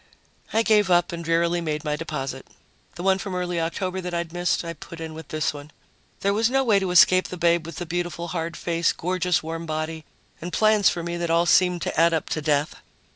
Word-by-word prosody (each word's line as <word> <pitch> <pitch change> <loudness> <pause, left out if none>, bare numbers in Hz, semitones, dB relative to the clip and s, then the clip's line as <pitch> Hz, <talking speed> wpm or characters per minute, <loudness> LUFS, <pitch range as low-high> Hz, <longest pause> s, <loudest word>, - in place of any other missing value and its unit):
I 225 +1 +2
gave 210 -3 +3
up 175 0 +3
and 170 0 -5
drearily 170 +1 +1
made 150 -2 -3
my 150 0 0
deposit. 135 -4 -5 0.5
The 175 - -6
one 190 0 +3
from 195 -3 -5
early 180 -2 -1
October 185 +3 -2
that 180 -1 -4
I'd 170 -1 -3
missed 175 0 0
I 170 - -4
put 165 +1 -11
in 160 -1 -6
with 160 -1 -9
this 155 0 -1
one. 145 0 -10 0.5
There 200 0 +2
was 220 +2 +2
no 270 +1 +2
way 215 -5 +4
to 190 -1 -2
escape 185 +1 +5
the 180 - -7
babe 170 -1 +2
with 165 - -8
the 175 - -5
beautiful 175 0 -3
hard 165 0 -3
face, 170 -1 0
gorgeous 180 0 0
warm 165 +1 -5
body 155 0 -3 0.4
and 175 +2 -5
plans 215 -1 +4
for 170 - -3
me 170 0 -3
that 170 -1 -2
all 170 +1 +3
seemed 180 -1 +3
to - - -2
add 165 0 +4
up 160 - -3
to 155 - -2
death. 145 0 0
170 Hz, 230 wpm, -24 LUFS, 160-180 Hz, 0.5 s, escape